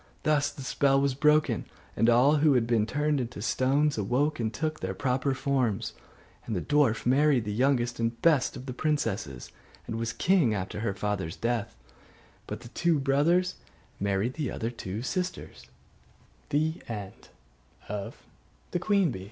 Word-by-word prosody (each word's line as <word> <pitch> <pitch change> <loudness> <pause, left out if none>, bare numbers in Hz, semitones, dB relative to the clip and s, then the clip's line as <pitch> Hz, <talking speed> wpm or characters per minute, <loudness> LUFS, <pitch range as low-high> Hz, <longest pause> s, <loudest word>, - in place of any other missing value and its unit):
Thus 150 -1 +2
the 135 - -9
spell 135 +1 +2
was 140 -1 +1
broken, 150 +3 +2 0.3
and 115 - +3
all 130 +6 +5
who 150 0 +4
had 120 -2 +3
been 115 -2 +1
turned 150 +1 0
into 120 -2 -6
stones 135 +5 +1
awoke, 130 +9 0
and 110 -2 -1
took 155 +7 -3
their - - -4
proper 135 0 0
forms. 130 -7 0 0.5
And 110 - -2
the - - 0
dwarf 145 -4 +2
married 135 -1 +3
the 105 - -3
youngest 120 0 +1
and 115 0 +1
the - - -20
best 145 -1 +2
of 130 - -9
the 130 - -5
princesses, 115 - -2 0.3
and 115 - -4
was 115 0 -1
king 165 - +2
after 95 +1 -4
her 105 -3 -2
father's 100 -5 -2
death; 115 - -2 0.7
but - - -6
his 120 - -11
two 170 +1 +2
brothers 150 +7 +2 0.4
married 100 +4 0
the 150 -3 -3
other 115 +1 -3
two 105 -2 -5
siste 185 +6 -4
130 Hz, 145 wpm, -28 LUFS, 115-145 Hz, 0.7 s, all